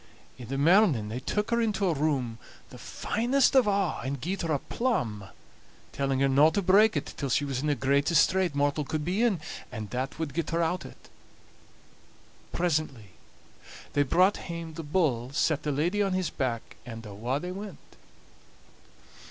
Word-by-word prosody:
In 120 - -8
the 135 +3 -3
morning 155 - +4
they 115 +3 -4
took 210 - -2
her 235 0 +2
into 215 -3 0
a 175 - +2
room, 135 -6 -1 0.3
the - - -11
finest 245 +6 +1
of 260 -4 +5
a', 195 -4 +1
and 140 +1 -3
gied 185 +9 -3
her 165 -2 -2
a 150 - +2
plum, 125 - -2 0.7
telling 135 -1 -1
her 140 - +4
no 140 +3 +5
to 200 +4 -1
break 210 +4 +5
it - - -4
till 140 - -3
she 145 +3 +1
was 135 -3 -2
in 150 - -2
the 145 - +2
greatest 140 +5 +3
strait 185 -5 0
mortal 145 +1 +1
could 150 +1 -3
be 185 +6 0
in, 225 -7 +2 0.3
and 110 -3 -6
that 130 +2 -3
wad 155 -4 -4
get 165 0 -2
her 170 0 +1
out 175 +2 -2
o't. - - -16 1.4
Presently 155 - -1 0.8
they 145 - +3
brought 185 +8 +3
hame 170 -2 -7
the 165 - -6
bull, 145 -7 0
set 150 0 +1
the 150 - -2
lady 170 +9 0
on 195 -2 +1
his 185 -3 -1
back, 120 -4 -3
and 115 -2 -9
awa' 115 +7 -3
they 180 +3 -5
went. 195 -3 -7
155 Hz, 180 wpm, -28 LUFS, 135-185 Hz, 1.4 s, of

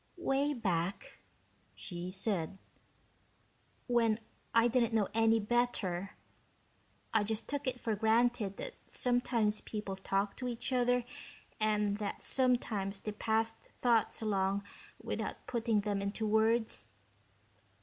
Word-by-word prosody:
"Way 285 -3 +1
back," 185 -5 -2 0.6
she 175 -1 -6
said, 190 -2 -1 1.3
"when 230 -3 +3 0.3
I 230 +1 +5
didn't 235 -1 +2
know 210 -3 +2
any 225 0 +4
better, 205 -5 0 1.0
I 220 -2 +4
just 215 +1 -2
took 285 -1 -3
it 250 -1 -1
for 225 -3 -1
granted 220 -1 +2
that - - -5
sometimes 240 -4 +1
people 210 -3 -4
talked 195 +1 -1
to 250 - -2
each 240 +2 -3
other 245 -1 +2 0.5
and 210 -1 +1
that 205 -1 -4
sometimes 220 -6 +1
they 215 - -4
passed 225 +1 0
thoughts 230 -2 +1
along 200 -1 +1 0.4
without - - -4
putting 230 -3 +1
them 200 -1 -1
into 200 +2 -2
words. 220 +1 +2
220 Hz, 120 wpm, -33 LUFS, 200-240 Hz, 1.3 s, I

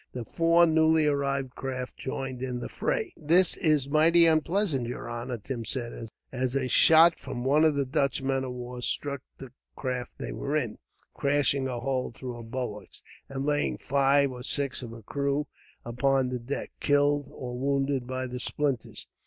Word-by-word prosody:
The 125 -2 -5
four 165 +6 +4
newly 160 -1 +4
arrived 140 -2 0
craft 130 -1 -5
joined 130 -1 -5
in 125 -1 -3
the - - -6
fray. - - -2
"This 170 +4 +3
is 150 -4 +2
mighty 165 +3 +6
unpleasant, 160 - +2
yer 120 - -5
honor," 120 +1 -4
Tim 115 +2 -5
said, 120 -1 -4 0.2
as 130 0 -2
a 135 -2 +1
shot 160 +6 +6
from 120 - -5
one 145 +4 +4
of 155 -2 +4
the 140 -1 +1
Dutch 135 +1 0
men 135 0 0
of 130 - -4
war 125 0 -7
struck 140 +2 -2 0.2
the 135 -3 -10 0.2
craft 125 -2 -4
they - - -5
were 145 - -3
in, 120 -8 -1 0.3
crashing 140 -1 +1
a 125 -2 -3
hole 130 0 -1
through 125 +1 -7
her 120 - -8
bulwarks, 115 -4 -6 0.3
and 135 0 -3
laying 145 0 0
five 140 0 +2
or 125 -1 -8
six 135 0 -2
of 120 - -7
her 115 -1 -10
crew 140 +4 -1 0.4
upon 130 +2 +1
the 125 0 -3
deck, 120 +4 -5
killed 145 -1 +2
or 125 -4 -6
wounded 135 -1 0
by 130 0 -3
the 125 0 -5
splinters. 135 -2 -2
135 Hz, 175 wpm, -28 LUFS, 125-145 Hz, 0.4 s, mighty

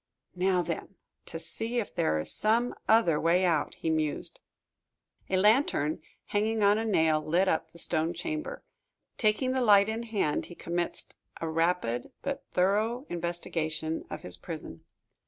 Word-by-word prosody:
"Now, 180 0 +2
then, 170 +3 -5 0.3
to - - -6
see 225 +9 -1
if 230 - -2
there 80 0 +1
is 75 - -3
some 230 +3 +2 0.2
other 220 -9 +5
way 175 +3 +3
out," 165 -4 +1
he 160 - -2
mused. 155 -2 -1 0.9
A 185 - +2
lantern, 195 - +3 0.2
hanging 215 +1 0
on 205 +2 +5
a 225 - -1
nail, 160 -7 +3
lit 175 +5 +2
up 160 -2 0
the 170 - -16
stone 165 -1 +1
chamber. 310 - -4 0.6
Taking 220 +4 +2
the 260 0 0
light 205 -3 +6
in 220 +1 -2
hand, 215 -10 -1
he 175 - -11
commenced 175 +1 -3 0.3
a 165 - -3
rapid 160 -7 0
but 280 0 -4
thorough 215 +8 +1
investigation 165 -2 -3
of - - -6
his 90 0 -4
prison. 155 - -8
180 Hz, 155 wpm, -29 LUFS, 160-220 Hz, 0.9 s, light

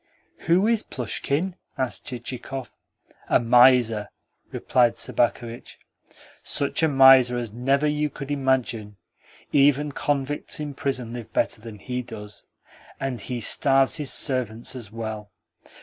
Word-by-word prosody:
"Who 180 +4 +4
is 225 -1 +2
Plushkin?" 150 - -3 0.2
asked 130 -2 -3
Chichikov. 125 +1 -6 0.6
"A - - +4
miser," 120 -3 +4 0.4
replied 120 -2 +2
Sobakevitch. 120 0 -2 0.6
"Such 140 +3 -1
a 160 - +4
miser 130 -3 +6
as 120 -3 -5
never 135 +5 +1
you 150 0 0
could 140 0 -8
imagine. 130 -7 -1 0.5
Even 145 +1 +3
convicts 145 +1 -1
in 150 -1 -4
prison 130 -4 -3
live 115 -2 -8
better - - 0
than 110 -2 -9
he 125 +5 -4
does. 105 -4 -10 0.5
And 130 -5 -3
he 125 +3 -4
starves 135 +4 +2
his 150 -3 -2
servants 125 -2 -2
as 115 -5 -8
well." 110 -2 -6
130 Hz, 125 wpm, -24 LUFS, 115-140 Hz, 0.6 s, miser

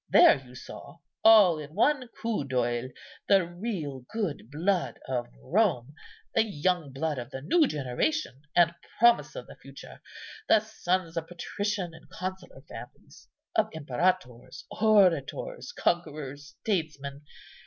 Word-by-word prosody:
There - - +7
you 125 -1 -15
saw, 140 +4 -10 0.3
all 210 -7 +7
in 150 +1 -9
one 285 -4 +2
coup 230 -6 -3
d'œil, 125 -1 -1 0.4
the 195 -3 +5
real 175 - -5
good 185 - -3
blood 175 +5 0
of 125 -2 -2 0.2
Rome, 120 - +1 0.4
the - - +4
young 180 -6 -1
blood 145 +1 -2
of 120 - -7
the 135 - -7
new 305 - +4
generation, 140 - -2
and 170 -1 +5 0.2
promise 235 - +4
of - - -6
the - - -13
future; - - -12 0.5
the 220 - +7
sons 185 -5 -2
of 165 -1 -2
patrician 190 0 -3
and 160 - -15
consular 185 0 -7
families, - - -12 0.3
of 220 0 +3
imperators, 135 -4 -1
orators, 210 - +2
conquerors, 150 - -2
statesmen. 150 -8 -2
170 Hz, 130 wpm, -28 LUFS, 140-205 Hz, 0.5 s, There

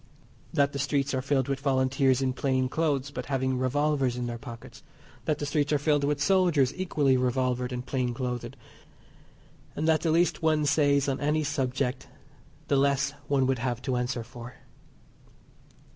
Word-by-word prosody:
That 140 0 +2
the 140 - -3
streets 140 0 0
are 130 - 0
filled 135 -1 0
with 135 -1 -2
Volunteers 135 -1 +2
in 130 -1 0
plain 130 -1 0
clothes, 140 -3 -1
but 125 -2 -6
having 130 -2 0
revolvers 135 -1 +1
in 125 - -2
their 120 -1 -5
pockets. 115 -3 -10 0.4
That 155 - 0
the 145 - -3
streets 145 0 0
are 150 - +4
filled 145 0 +1
with 145 0 0
soldiers 165 -5 +3
equally 150 -8 +1
revolvered 125 0 0
and 125 0 -4
plain 125 -2 -1
clothed, 125 -1 -4 1.2
and 155 - -1
that 160 -2 +3
the 165 - 0
least 170 +3 +2
one 155 -2 +2
says 140 -1 +3
on 135 -1 -1
any 150 +2 +1
subject 135 -2 -2 0.6
the 140 - +2
less 140 0 +2 0.2
one 135 -2 +2
would 130 -1 0
have 120 -1 -2
to 130 -1 -1
answer 125 -1 -2
for. 120 +1 -10
135 Hz, 170 wpm, -27 LUFS, 130-145 Hz, 1.2 s, are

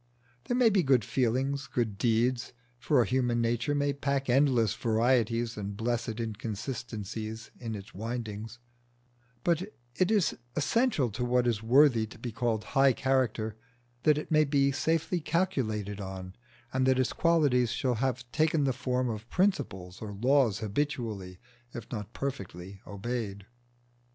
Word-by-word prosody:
There 245 - 0
may 240 -3 +5
be 195 -2 +4
good 130 -7 +3
feelings, 130 +4 0
good 110 -5 -2
deeds 120 +1 +1 0.3
for 130 -1 +3
a - - -2
human 125 -2 +1
nature 115 +4 0
may 145 0 +1
pack 140 -1 -1
endless 125 -5 +3
varieties 115 0 +1
and 100 -1 -5
blessed 115 0 -2
inconsistencies 110 0 -5
in 115 -3 -4
its 100 +2 -9
windings 110 0 -5 0.9
but 170 -1 +2 0.3
it 185 +6 +1
is 210 -5 +3 0.2
essential 155 - +1
to 120 +5 -3
what 125 0 +2
is 115 -3 +1
worthy 120 -1 +5
to 115 - -13
be 120 +1 -5
called 115 -1 -1
high 135 -1 +5
character, 120 -5 0 0.5
that 150 +1 +4
it 150 - -5
may 155 0 +5
be 140 -1 +2
safely 165 +5 0
calculated 110 - -1
on, 95 -1 -7 0.4
and 130 0 +2
that 130 -1 +4
its 130 -1 +1
qualities 145 -8 +3
shall 125 0 0
have 125 0 -1
taken 155 -1 +2
the 135 -2 +2
form 125 0 -1
of 110 0 -5
principles 95 - -1
or 110 -2 -5
laws 120 0 +3
habitually, 110 -5 -3 0.4
if 115 -2 -8
not 105 -2 -5
perfectly, 95 -8 -6
obeyed. 100 -1 -4
120 Hz, 145 wpm, -29 LUFS, 110-140 Hz, 0.9 s, may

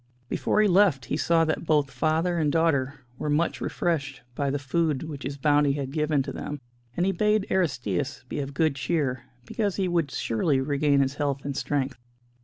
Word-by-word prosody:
Before - - 0
he - - +4
left, 180 -9 +4
he 140 - -2
saw 165 +1 +3
that 155 +1 -2
both 145 -3 +2
father 165 +2 +1
and 150 -2 +2
daughter 145 -4 +1 0.2
were 150 - -2
much 150 +3 0
refreshed 145 -6 -2
by 140 +2 -1
the 140 - 0
food 150 +1 0
which 150 -3 -7
his 140 +1 -5
bounty 145 0 +3
had 140 -2 -4
given 150 -2 +1
to 135 - -5
them, 145 +2 -5 0.4
and 175 - +2
he 195 - +2
bade 210 +2 +2
Aristćus 130 - -1
be - - -4
of 140 0 -5
good 155 -2 +2
cheer, 135 -4 -1 0.2
because 205 - -1
he 190 -2 0
would 170 -4 0
surely 130 +3 0
regain 140 +1 +2
his 135 0 0
health 140 -2 -2
and 140 -1 -3
strength. 135 -1 -2
145 Hz, 195 wpm, -26 LUFS, 135-165 Hz, 0.4 s, he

